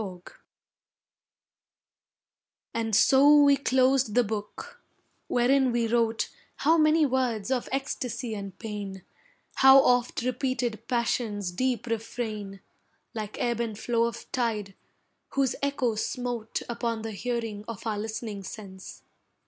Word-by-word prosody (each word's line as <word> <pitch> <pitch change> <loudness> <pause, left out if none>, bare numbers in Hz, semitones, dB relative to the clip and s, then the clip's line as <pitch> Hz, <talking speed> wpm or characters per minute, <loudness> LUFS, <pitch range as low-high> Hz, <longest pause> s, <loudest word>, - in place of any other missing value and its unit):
FINIS 185 -4 -7 2.5
And 225 -2 0
so 285 +6 +6
we 285 0 +6
closed 260 -3 +2
the 245 - +5
book, 220 - -6 0.5
wherein 255 +1 +3
we 235 -1 +1
wrote 230 -1 +1 0.3
How 320 +3 +3
many 310 0 +4
words 250 -4 -1
of 255 -2 -1
ecstasy 250 -3 -3
and 200 -2 -7
pain, 205 -4 -6 0.5
How 265 0 +8
oft 245 -2 +2
repeated 250 -3 -2
passion's 230 -5 -1
deep 250 +6 -1
refrain, 215 -3 -4 0.5
Like 215 -2 -5
ebb 235 -1 0
and 225 -3 -2
flow 230 +1 +1
of 235 0 -5
tide, 215 -5 -1 0.6
whose 270 -3 +2
echo 280 -4 0
smote 235 0 -3
Upon 235 -2 -3
the 225 - -4
hearing 225 -1 -3
of 230 -2 -7
our 215 -2 -1
listening 220 -1 -5
sense. 190 -1 -10
235 Hz, 120 wpm, -27 LUFS, 215-255 Hz, 2.5 s, How